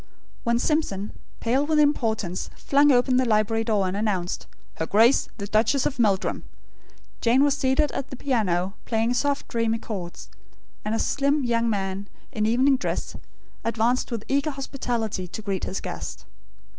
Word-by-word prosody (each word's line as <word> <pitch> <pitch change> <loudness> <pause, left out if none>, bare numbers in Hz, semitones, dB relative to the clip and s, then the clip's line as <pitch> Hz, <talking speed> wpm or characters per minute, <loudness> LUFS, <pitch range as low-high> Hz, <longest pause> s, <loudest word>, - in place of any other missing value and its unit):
'" - - -31
When 235 0 +3
Simpson, 235 - 0 0.3
pale 255 +5 +2
with 310 +1 +1
importance, 220 -11 +1
flung 285 +1 +4
open 250 0 +3
the 260 - +4
library 225 0 +2
door, 210 -4 +1
and 185 - -2
announced: 200 -4 -2 0.3
"Her 160 - -2
Grace, 230 +6 +4
the 200 - -4
Duchess 220 +6 +2
of 275 -2 -2
Meldrum," 200 -5 +1 0.8
Jane 245 +4 +4
was 285 -1 +3
seated 265 +3 +2
at 275 0 -4
the 270 - -6
piano, 195 -9 0
playing 225 +1 +1
soft 285 +3 0
dreamy 230 -1 0
chords; 190 -6 -7 0.5
and 215 +1 -1
a - - +1
slim 280 +4 +1
young 235 -1 +1
man, 195 -1 -2 0.2
in 215 -1 0
evening 260 +4 +4
dress, - - -3 0.5
advanced 230 +2 +1
with 225 -2 -4
eager 280 +3 +1
hospitality 245 -8 -3
to 185 - -7
greet 195 -3 -2
his 190 - -3
guest. - - -6
230 Hz, 160 wpm, -25 LUFS, 210-265 Hz, 0.8 s, flung